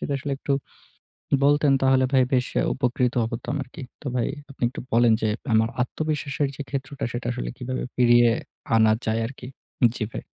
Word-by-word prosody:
যদি 145 - -3 0.2
একটু 140 - -2 0.9
বলতেন 145 0 +4
তাহলে 130 0 +4
ভাই 130 - +5
বেশ 125 -1 +3
আ - - +2
উপকৃত 125 -1 0 0.2
হতাম 125 +5 -3
আরকি। 130 +4 -10 0.2
তো - - -10
ভাই, 120 - +1 0.2
আপনি 135 - -14
একটু 130 - -7
বলেন 115 0 +5
যে, 110 - +2 0.3
আমার 110 +1 +4
আত্মবিশ্বাসের 150 +1 -2
যে 145 - -4
ক্ষেত্রটা 140 +1 -4
সেটা 120 0 -4
আসলে - - -4
কীভাবে 130 +1 -4
ফিরিয়ে 120 -1 +6 0.5
আনা 110 -1 +5
যায় 110 +1 +1
আরকি? 125 0 -9 0.5
জি 110 - -1
ভাই। - - -6
125 Hz, 170 wpm, -24 LUFS, 120-140 Hz, 0.9 s, ফিরিয়ে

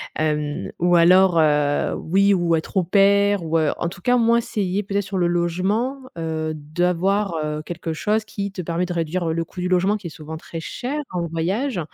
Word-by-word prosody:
Hem 150 -1 -1
ou 175 +1 +3
alors 180 +1 +5
heu, 150 -2 +2
oui 195 +4 +2
ou 175 -3 +2
être 160 - -7
au 190 - +3
pair 200 +2 +3
ou 165 0 0
heu, 155 -2 +2
en 170 - -2
tout 180 +1 -8
cas, 245 +6 +3
au - - +3
moins, 230 0 +4
essayer 205 -3 -2
peut-être 200 +1 -1
sur 195 -1 -4
le 175 -1 +2
logement, 185 +9 0 0.2
heu, 160 -1 -2
d'avoir, 180 +5 0
heu, 150 0 -3
quelque 170 -1 -5
chose 215 +6 0
qui 200 -2 -5
te 185 -1 -5
permet 170 +1 -1
de 180 - -6
réduire, 170 +1 -1
heu, - - 0
le 165 0 -2
coût 180 - -8
du 180 - -1
logement 185 +3 +2
qui 200 -5 -6
est - - -6
souvent 155 0 -9
très 165 +1 -7
cher 255 - -4
en 175 -2 -2
voyage 185 - -1
175 Hz, 215 wpm, -22 LUFS, 165-200 Hz, 0.2 s, alors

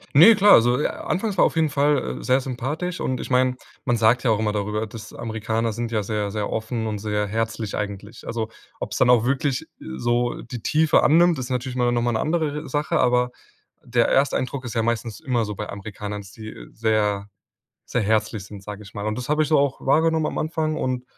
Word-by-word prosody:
Ne, 210 +10 +9
klar, 200 +1 +5
also, 120 +3 +5
äh - - 0
anfangs 195 -1 -3
war - - +7
auf - - 0
jeden 160 -1 +2
Fall, 145 -1 +1
äh, - - -9
sehr 130 +1 +3
sympathisch. 140 +8 -4
Und 130 -1 -2
ich - - -6
mein, 125 0 +3 0.3
man 120 -2 +1
sagt 115 +3 +3
ja 120 - +2
auch 110 - +3
immer 110 -1 0
darüber, 105 +1 -2
dass 110 0 -10
Amerikaner 110 0 -2
sind 115 0 -4
ja 105 -2 0
sehr, 105 -1 -2
sehr 105 0 -3
offen 110 0 -2
und 105 -2 -3
sehr 105 0 -1
herzlich 110 0 -2
eigentlich. 105 +2 -6
Also, 115 -1 -3 0.3
ob's - - -4
dann 125 - +4
auch 120 -2 +5
wirklich 135 0 0
so 120 - -1
die 120 -1 -7
Tiefe 155 +6 +3
annimmt, 170 0 +4
ist 125 0 -5
natürlich 125 0 -2
mal 125 -1 +2
noch 120 -1 +1
mal 120 - +1
'ne 110 - 0
andere 155 -2 0
re 150 -1 -6
Sache, 145 +3 0
aber 125 0 +2 0.5
der 120 -1 +2
Ersteindruck 135 -1 +1
ist 115 - -6
ja 115 - +1
meistens 115 -1 -2
immer 125 -7 0
so 105 -1 -5
bei 105 - -5
Amerikanern, 105 0 -6
dass 95 0 -13
die 110 -1 -9 0.2
sehr, 105 -3 0 0.6
sehr 125 - 0
herzlich 110 -1 0
sind, 100 -1 -10
sag 105 +1 -8
ich 100 - -13
mal. 105 +1 -5
Und 110 - -1
das 125 +3 -5
hab 150 +1 +2
ich 150 - +2
so 155 - +4
auch 140 -1 +1
wahrgenommen 160 +3 +3
am - - -4
Anfang 155 0 -1
und 125 -1 -2
120 Hz, 225 wpm, -23 LUFS, 110-135 Hz, 0.6 s, Ne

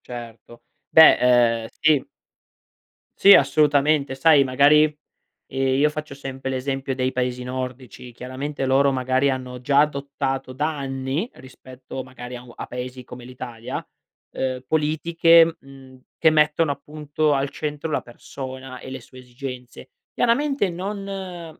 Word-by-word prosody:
Certo. 120 -1 -10 0.3
Beh, 160 0 +8 0.4
ehm, 110 - -7
sì. 155 -4 +3 1.1
Sì 200 - +8
assolutamente. 145 -2 +3
Sai 150 0 +5
magari, 140 +3 +5 0.6
ehm, 135 0 0
io 150 +1 +4
faccio 150 -1 -7
sempre 135 -1 -6
l'esempio 135 0 -3
dei 130 0 -1
paesi 125 -1 -2
nordici: 125 -1 -7
chiaramente 135 +4 -5
loro 135 +1 +3
magari 130 +1 +1
hanno 125 -1 -4
già 140 +2 +3
adottato 140 -2 -3
da 150 +3 -2
anni, 135 - -3
rispetto 130 0 -10
magari 125 -1 -9
a 120 - -9
u 120 -1 -14
a - - -6
paesi 125 +1 -7
come 125 0 -11
l'Italia, 120 -2 -7 0.5
ehm, 130 -1 -3
politiche, 165 +2 +3
mhmm, 135 -1 -16 0.2
che 160 - +5
mettono 150 0 +2
appunto 150 +1 -2
al 140 0 0
centro 150 +2 -5
la - - 0
persona 130 +1 -9
e - - -10
le 130 -1 -7
sue 130 +2 -15
esigenze. 125 0 -9 0.2
Chiaramente 255 -2 +1
non 185 -3 -6
135 Hz, 135 wpm, -22 LUFS, 130-150 Hz, 1.1 s, Beh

